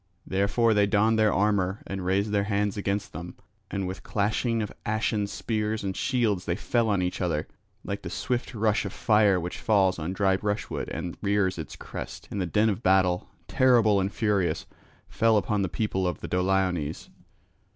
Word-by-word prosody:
Therefore 100 +4 +2
they 105 -1 +3
donned 110 +2 +3
their 110 -1 +4
armour 100 -1 +1
and 95 -1 -5
raised 100 +3 +1
their 100 -1 +1
hands 100 -1 0
against 100 0 -2
them. 85 +3 -7 0.3
And 95 -1 -2
with 95 +1 -6
clashing 110 +2 0
of 105 - -6
ashen 110 -1 0
spears 110 0 -2
and 95 -1 -2
shields 115 -8 0
they 85 - 0
fell 115 +3 0
on 100 -3 +1
each 90 +1 -2
other, 80 -4 -1 0.4
like - - -4
the - - -6
swift 125 0 -3
rush 110 0 +1
of 100 - -5
fire 105 -4 +3
which 90 +1 -5
falls 95 -4 +2
on 80 +4 -3
dry 95 -1 +2
brushwood 105 +1 -3
and 85 - -5
rears 100 -3 +1
its 80 - -6
crest; - - -8
and 100 - -2
the 90 - -1
din 105 +6 +2
of 105 0 -1
battle, 90 -2 +2 0.2
terrible 115 -6 +4
and 95 +1 -1
furious, 105 -6 0 0.4
fell 115 -1 +3
upon 105 0 0
the 95 - 0
people 95 +2 -1
of 90 - -3
the - - -5
Doliones. 90 -4 0
100 Hz, 185 wpm, -27 LUFS, 95-110 Hz, 0.4 s, their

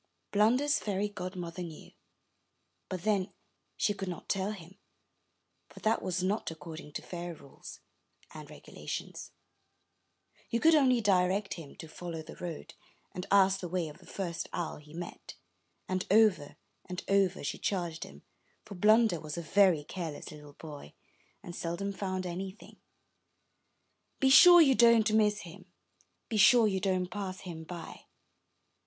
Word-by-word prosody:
Blunder's 255 +9 +3
fairy 205 0 -2
godmother 180 -3 -6
knew, 165 -3 -9 1.0
but 185 -2 -5
then 200 -3 +1 0.5
she 205 - +1
could 195 -1 -6
not 175 - -7
tell 195 +1 -1
him, 190 -1 -11 0.9
for - - -13
that 220 +1 +1
was 185 0 -2
not 200 +4 -1
according 160 -1 -9
to - - -5
fairy 175 -1 -6
rules 140 -3 -13 0.5
and - - -10
regulations. - - -7 1.2
She 235 - 0
could 320 +7 +5
only 260 -5 +4
direct 195 0 +2
him 160 -5 -10
to 160 - -9
follow 165 0 -7
the 155 - -11
road, 170 -3 -7 0.4
and 180 +1 -6
ask 195 -1 +4
the 180 - -5
way 175 -2 -2
of 150 - -13
the - - -18
first 175 -4 -4
owl 170 - -3
he 150 +1 -15
met; 175 0 -8 0.5
and 185 0 -2
over 200 -8 +3 0.3
and 180 0 -5
over 195 -2 +2
she 145 - -3
charged 175 -4 -2
him, 70 +1 -13 0.4
for 205 - -9
Blunder 215 -1 +4
was 155 +1 -7
a 170 - -4
very 180 -2 +4
careless 160 -1 -6
little 150 -1 -12
boy, 145 - -11 0.5
and 175 - -8
seldom 180 +4 -3
found 185 -1 -3
anything: 190 +4 -7 1.4
''Be 265 -1 +4
sure 350 +5 +10
you 275 -4 +6
don't 235 -3 +5
miss 210 -1 +3
him, 185 +2 -13 0.3
— - - -38
be 220 - -2
sure 225 +3 +7
you 190 -2 0
don't 185 -1 -1
pass 195 -3 -5
him 170 -4 -8
by." 170 0 -9
185 Hz, 150 wpm, -30 LUFS, 170-210 Hz, 1.4 s, sure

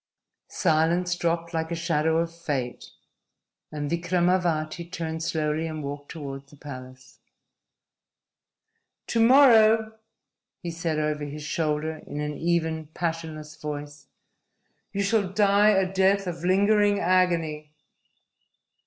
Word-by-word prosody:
Silence 170 +1 +1
dropped 170 0 -1
like 160 0 -2
a 170 - -2
shadow 160 -1 +1
of 165 0 -1
fate, 140 -7 -4 0.8
and 150 -1 -4
Vikramavati 170 -1 0
turned 160 -2 -4
slowly 160 0 -1
and 155 -1 -5
walked 145 0 -6
toward 140 -3 -7
the 145 - -17
palace. 130 -2 -11 1.9
"To 230 - -1
morrow," 225 -3 +5 0.6
he 170 - -6
said 165 -2 -2
over 150 -1 -1
his 150 +1 -7
shoulder, 155 +1 -2
in 145 - -5
an 150 0 -3
even, 160 -1 -1
passionless 160 -2 -4
voice, 145 -1 -7 0.8
"you 200 - -1
shall 200 -1 +1
die 205 +1 +4
a 195 -2 +2
death 195 +1 +3
of 170 -2 -5
lingering 205 +2 +3
agony." 170 -5 +1
165 Hz, 115 wpm, -26 LUFS, 150-185 Hz, 1.9 s, morrow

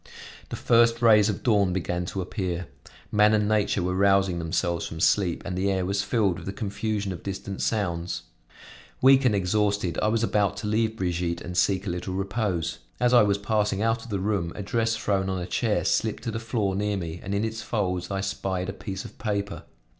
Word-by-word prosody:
The - - -4
first 115 0 +3
rays 105 -2 +6
of 100 - -3
dawn 100 -6 +3
began 90 -1 -2
to 95 - -3
appear: 90 -1 -3 0.5
man 105 +1 +5
and 105 -1 +1
nature 105 -3 +1
were 90 +1 0
rousing 95 -2 +3
themselves 85 +1 -1
from 80 - -7
sleep 90 0 +2
and 95 - -3
the 95 +2 0
air 95 -2 0
was 100 +1 0
filled 100 -3 +1
with - - -10
the 95 - -3
confusion 105 -2 -2
of 85 - -8
distant 100 0 -5
sounds. 90 -5 -1 0.8
Weak 135 +1 +6
and 115 -5 +4
exhausted 100 -2 0
I - - +2
was 115 +1 +1
about 100 -3 +1
to 105 - -4
leave 110 +1 0
Brigitte, 85 -2 -1
and 90 - -6
seek 95 +3 +2
a 95 - -1
little 90 +1 -4
repose. 95 -4 -2 0.2
As 125 0 +3
I 120 - +8
was 100 -1 +3
passing 105 0 0
out 115 0 +1
of 120 - -11
the 100 - -1
room, 95 -4 -1
a 105 - -5
dress 115 +2 0
thrown 100 -3 0
on 95 -1 -1
a 90 - -3
chair 110 +3 0
slipped 110 -2 0
to 115 - -2
the 110 - -3
floor 110 -4 -1
near 105 0 0
me, 85 -2 -5
and 100 +1 -3
in 105 +2 +1
its 110 0 -4
folds 90 -5 -2
I 95 -1 -2
spied 95 -1 -2
a - - -3
piece 95 -1 -6
of - - -12
paper. 100 -2 -3
100 Hz, 215 wpm, -26 LUFS, 90-110 Hz, 0.8 s, I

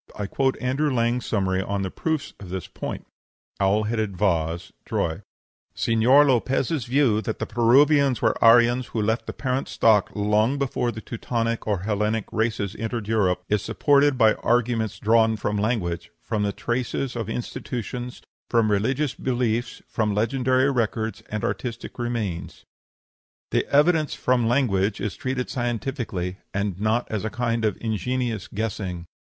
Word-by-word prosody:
I 105 - -2
quote 130 +6 0
Andrew 135 +4 0
Lang's 120 0 0
summary 95 -3 0
of 100 0 -2
the 95 - -3
proofs 160 -3 -2
on 95 - -10
this 90 -2 -4
point: - - -6 0.5
OWL 100 +2 +3
HEADED 110 -3 -2
VASE, 85 -4 0
TROY 80 +4 -2 0.5
"Señor 120 +6 +4
Lopez's 130 - +1
view, 125 -4 +2
that 110 - -3
the - - -3
Peruvians 135 +4 +4
were - - +2
Aryans 120 +2 +5
who 115 - -2
left 110 +3 -1
the - - -2
parent 130 0 -2
stock 110 -3 +3
long 105 +5 +2
before 125 -3 -1
the 110 0 -8
Teutonic 115 0 -3
or 100 -4 0
Hellenic 105 +1 0
races 110 -3 -1
entered 115 -1 -3
Europe, 95 -5 +1
is 105 -1 +1
supported 145 +1 +3
by 110 -3 +5
arguments 115 -2 0
drawn 110 +1 +3
from 105 0 -2
language, 100 -5 -1
from 110 -3 -2
the 100 0 +1
traces 120 +5 -2
of 115 -3 -3
institutions, 120 +1 -5 0.3
from 115 -3 +3
religious 130 +7 +1
beliefs, 120 -2 -2
from 105 -3 -1
legendary 130 +4 +2
records, 115 -3 -1
and 105 -1 -3
artistic 120 -1 -4
remains. 115 -8 -3 0.9
The - - +1
evidence 155 +1 +3
from 125 -2 +1
language 105 -6 +1
is 100 +1 -3
treated 130 -1 -3
scientifically, 120 - -3 0.2
and 100 -2 -2
not 110 +3 +1
as 110 -2 -2
a 110 - -1
kind 115 +1 -1
of 105 -3 +1
ingenious 115 0 -2
guessing. 100 -5 -4
115 Hz, 150 wpm, -24 LUFS, 105-125 Hz, 0.9 s, Aryans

